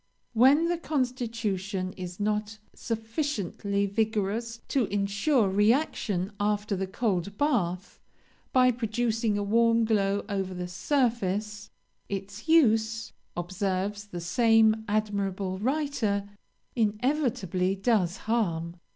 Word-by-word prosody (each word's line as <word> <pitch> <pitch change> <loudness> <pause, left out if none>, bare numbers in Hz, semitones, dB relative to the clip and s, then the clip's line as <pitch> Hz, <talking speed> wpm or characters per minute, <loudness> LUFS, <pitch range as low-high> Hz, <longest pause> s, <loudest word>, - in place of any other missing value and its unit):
When 265 +8 +5
the 345 -1 0
constitution 225 - -2
is 180 0 -7
not 210 +1 -1 0.2
sufficiently 220 - -2
vigorous 220 +2 -1
to 265 -4 +2
ensure 200 +5 +1
reaction 205 - +1
after 205 0 0
the 190 0 -2
cold 200 -2 -1
bath, 195 - 0 0.5
by 255 -1 +5
producing 225 -2 0
a 205 - -1
warm 230 +2 +3
glow 200 -2 +1
over 195 -2 -2
the 180 0 -4
surface, 210 -1 -1 0.4
'its 200 +5 -6
use,' 225 -7 +3 0.2
observes 190 +3 -2
the 175 -4 -6
same 220 +3 +3
admirable 200 -3 -1
writer, 230 -6 0 0.5
'inevitably 215 - 0
does 195 -4 +1
harm.' 175 -7 -1
210 Hz, 100 wpm, -28 LUFS, 195-230 Hz, 0.5 s, When